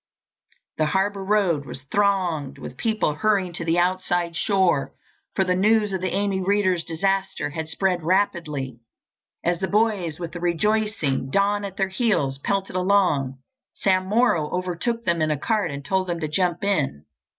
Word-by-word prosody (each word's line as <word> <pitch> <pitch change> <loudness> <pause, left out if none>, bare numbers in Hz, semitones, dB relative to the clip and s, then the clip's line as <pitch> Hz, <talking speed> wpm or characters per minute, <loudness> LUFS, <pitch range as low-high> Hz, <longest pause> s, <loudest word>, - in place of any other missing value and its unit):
The 155 - +3
Harbour 195 +3 0
road 190 -8 +1
was 130 +3 -8
thronged 185 -8 +1
with 125 - -8
people 215 - 0
hurrying 195 +1 +1
to 170 - -5
the 165 +1 +1
outside 175 -1 0
shore, 180 -4 +1 0.4
for 190 - +3
the 180 -1 +1
news 210 +1 +3
of 190 - -2
the 185 - 0
Amy 195 0 0
Readers 185 -3 +2
disaster 195 0 -1
had 160 +1 -4
spread 180 0 0
rapidly. 155 - 0 0.6
As 175 0 +1
the 190 - -1
boys, 200 -7 +1
with 170 -2 -5
the 175 - -6
rejoicing 175 -5 0
Don 200 +5 +2
at 195 -1 -6
their 195 -1 +1
heels, 190 - 0
pelted 195 +4 -2
along, 180 -9 +2 0.4
Sam 185 -1 +1
Morrow 205 -8 +2
overtook 185 +6 -2
them 170 -2 +1
in 155 - +2
a 150 - +1
cart 210 - 0
and 140 -1 -6
told 190 +2 0
them 170 -1 -2
to 155 - -1
jump 175 +3 0
in. 145 - 0
185 Hz, 165 wpm, -24 LUFS, 160-200 Hz, 0.6 s, The